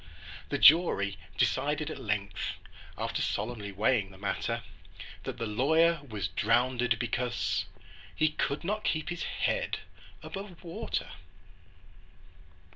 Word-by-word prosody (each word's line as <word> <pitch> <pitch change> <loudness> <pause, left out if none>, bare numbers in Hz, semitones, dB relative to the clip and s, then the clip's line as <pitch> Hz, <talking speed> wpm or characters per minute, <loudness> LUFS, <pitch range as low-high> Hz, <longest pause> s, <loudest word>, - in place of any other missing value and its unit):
The - - 0
jury 120 - +6 0.2
decided 150 +2 +1
at - - -6
length, 105 -2 -2 0.4
After - - -2
solemnly 105 -1 -2
weighing 105 +1 +2
the 95 - -14
matter, 100 +1 -2 0.6
That - - -4
the 115 - -2
lawyer 160 +10 +3
was 100 -8 -2
drownded, 120 +3 +2
because 120 +1 -1 0.5
He 155 - +3
could 150 0 -1
not 210 +4 -1
keep 155 +1 0
his 175 -1 -4
head - - 0 0.5
above 195 -3 -7
water! 200 +7 -3
125 Hz, 115 wpm, -30 LUFS, 105-165 Hz, 0.6 s, jury